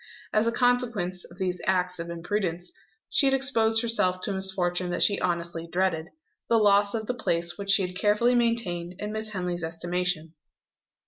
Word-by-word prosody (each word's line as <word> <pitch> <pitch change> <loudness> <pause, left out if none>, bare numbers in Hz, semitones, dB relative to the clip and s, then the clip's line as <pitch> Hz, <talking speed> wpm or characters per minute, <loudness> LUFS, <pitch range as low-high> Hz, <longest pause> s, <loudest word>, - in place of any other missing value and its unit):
As 215 +1 +2
a - - +2
consequence 230 -8 0
of 175 - -15
these 180 -2 -2
acts 180 -1 0
of 170 0 -5
imprudence, 175 0 -3 0.3
she 275 - +4
had 270 - +3
exposed 225 -4 +3
herself 185 -6 +2
to 205 - -3
a - - -2
misfortune 185 -2 0
that 175 - 0
she 200 - +3
honestly 170 -1 -2
dreaded 170 -2 -1 0.4
the 230 - +4
loss 205 0 +4
of 220 -1 -3
the 250 - -2
place 170 -8 -1
which 200 -1 -7
she 195 -1 +5
had 180 0 -8
carefully 210 +5 +2
maintained 220 -8 0
in 210 +1 -5
Miss 220 0 -2
Henley's 180 -4 -3
estimation. 170 0 -2
190 Hz, 180 wpm, -26 LUFS, 175-220 Hz, 0.4 s, she